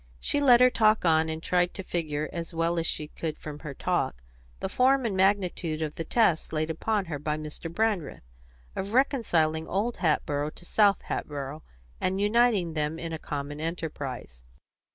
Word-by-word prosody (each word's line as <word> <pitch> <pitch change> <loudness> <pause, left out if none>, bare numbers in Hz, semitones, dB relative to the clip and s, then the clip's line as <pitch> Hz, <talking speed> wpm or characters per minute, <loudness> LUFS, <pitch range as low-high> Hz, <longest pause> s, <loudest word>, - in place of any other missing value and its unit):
She 285 - +1
let 250 -3 +7
her 250 0 +7
talk 215 -4 +3
on, 160 -1 +4
and 160 0 -4
tried 180 0 +1
to 190 - -5
figure, 155 -4 -2
as 170 0 -5
well 165 +1 +1
as 165 - 0
she 150 -1 -1
could 155 -1 -4
from 150 -1 -8
her 150 -3 -7
talk, - - -1 0.4
the - - -2
form 260 0 +3
and 210 -4 -1
magnitude 185 -5 +1
of 150 -1 -3
the 165 - -4
task 185 -3 +2
laid 155 0 -1
upon 205 +5 -1
her 155 -4 -4
by 150 +1 -2
Mr. 155 +2 -6
Brandreth, 205 - -1 0.5
of 195 +2 -4
reconciling 170 - +2
Old 215 +6 -1
Hatboro' 150 -3 0
to 175 - -11
South 200 +1 +3
Hatboro', 145 +1 -4 0.4
and 190 +1 0
uniting 210 -5 +3
them 155 0 -1
in 165 0 -5
a 160 - -4
common 145 0 -5
enterprise. 145 - -5
165 Hz, 175 wpm, -28 LUFS, 155-200 Hz, 0.5 s, let